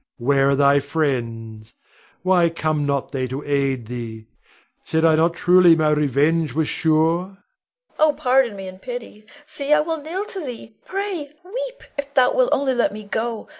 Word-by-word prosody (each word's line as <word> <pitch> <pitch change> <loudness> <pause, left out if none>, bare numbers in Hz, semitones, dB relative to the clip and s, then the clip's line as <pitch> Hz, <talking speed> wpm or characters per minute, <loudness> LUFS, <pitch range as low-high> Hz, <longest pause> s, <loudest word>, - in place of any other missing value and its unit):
Where 135 +2 +2
are 140 - +3
thy 140 0 +4
friends? 115 -7 -3 0.5
Why 180 -2 +3
come 155 -2 -1
they 145 - -1
not 140 -1 -1
to 130 +1 -3
aid 135 -4 0
thee? 115 -2 -7 0.6
Said 160 0 0
I 160 - +5
not 165 +2 +2
truly 180 -1 +5
my 155 -1 +2
revenge 150 +1 +1
was 160 -1 +1
sure? 160 +1 +2
Leonore. 190 +2 -10 0.6
Oh, 305 -1 +4
pardon 260 -5 +2
me, 195 -1 -7
and 185 0 -11
pity! 235 -3 -8 0.2
See, 285 -1 -2
I 300 0 +6
will 320 0 -3
kneel 350 +7 -4
to 385 -4 -6
thee, 240 -4 -8
pray, 385 -6 -3 0.2
weep, - - -6 0.2
if 285 0 -5
thou 260 - +4
wilt - - +3
only 270 -1 +1
let 245 - +1
me 215 +1 -8
go. 220 +2 -3
170 Hz, 175 wpm, -21 LUFS, -, 0.6 s, I